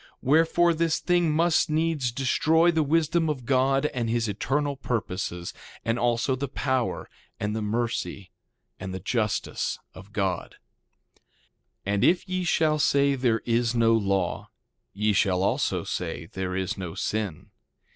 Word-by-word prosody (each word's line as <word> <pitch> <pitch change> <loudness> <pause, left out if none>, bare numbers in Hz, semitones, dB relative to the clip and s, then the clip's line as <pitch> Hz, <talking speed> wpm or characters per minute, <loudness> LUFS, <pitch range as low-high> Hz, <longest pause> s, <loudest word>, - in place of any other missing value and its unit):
Wherefore, 165 +4 +4
this 165 0 +1
thing 175 -2 +2
must 165 +1 +2
needs 155 -5 0
destroy 160 +7 +3
the 160 -1 +1
wisdom 160 +2 +2
of 130 -5 -3
God 135 +1 +2
and 120 -3 -2
his 115 0 0
eternal 140 +8 -1
purposes, 95 -8 -3 0.3
and 115 +1 0
also 120 +2 +1
the 140 +2 -3
power, 130 -2 -1 0.3
and 105 +1 -2
the 110 - -2
mercy, 105 -3 -3 0.5
and 95 0 -5
the - - -4
justice 105 +2 -1 0.2
of 95 +2 -13
God. 95 -4 -2 1.3
2:13 100 - 0
And 100 - +1
if 180 +2 +3
ye 185 0 -2
shall 155 -3 +2
say 140 -1 +3
there 125 -4 +1
is 120 0 +1
no 115 -1 +4
law, 100 -4 0 0.4
ye 105 +1 0
shall 95 -1 +2
also - - 0
say - - -4
there 95 -1 -4
is 95 +3 -2
no 90 -3 -5
sin. 105 -7 -3
120 Hz, 145 wpm, -26 LUFS, 105-150 Hz, 1.3 s, Wherefore